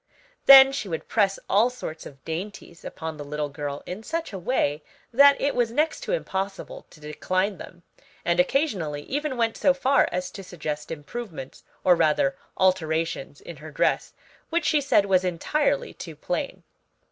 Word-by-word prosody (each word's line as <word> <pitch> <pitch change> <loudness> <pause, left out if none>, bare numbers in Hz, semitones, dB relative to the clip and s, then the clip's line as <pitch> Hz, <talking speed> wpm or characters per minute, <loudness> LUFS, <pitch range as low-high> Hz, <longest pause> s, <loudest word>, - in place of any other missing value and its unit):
Then 270 0 +10
she 270 -8 -4
would 160 - -4
press 200 -3 +2
all 215 +5 +4
sorts 205 -10 -7
of 135 -2 -16
dainties 170 0 -6
upon 160 -1 -6
the 145 - -6
little 150 0 -3
girl 145 0 -5
in 185 +4 -6
such 330 +2 -4
a 190 - -5
way 155 - 0 0.3
that 280 +3 +7
it 285 - 0
was 240 -2 +1
next 305 +7 0
to - - -4
impossible 195 - -4
to - - -17
decline 185 +6 -2
them, 175 -1 -11 0.4
and 170 +1 +1
occasionally 180 - 0
even 290 - -3
went 230 -1 0
so 275 -1 +3
far 270 +1 +3
as 180 0 -3
to 195 - -9
suggest 155 -4 -5
improvements, 160 - -7 0.2
or 180 - +6
rather 170 +3 +2 0.2
alterations, 165 -5 0
in 170 - -10
her 155 +3 -10
dress, 150 - 0 0.4
which 335 -1 0
she 300 - +3
said 265 -7 +3
was 190 -2 +3
entirely 185 - 0
too - - -9
plain. - - -4
185 Hz, 170 wpm, -25 LUFS, 160-260 Hz, 0.4 s, Then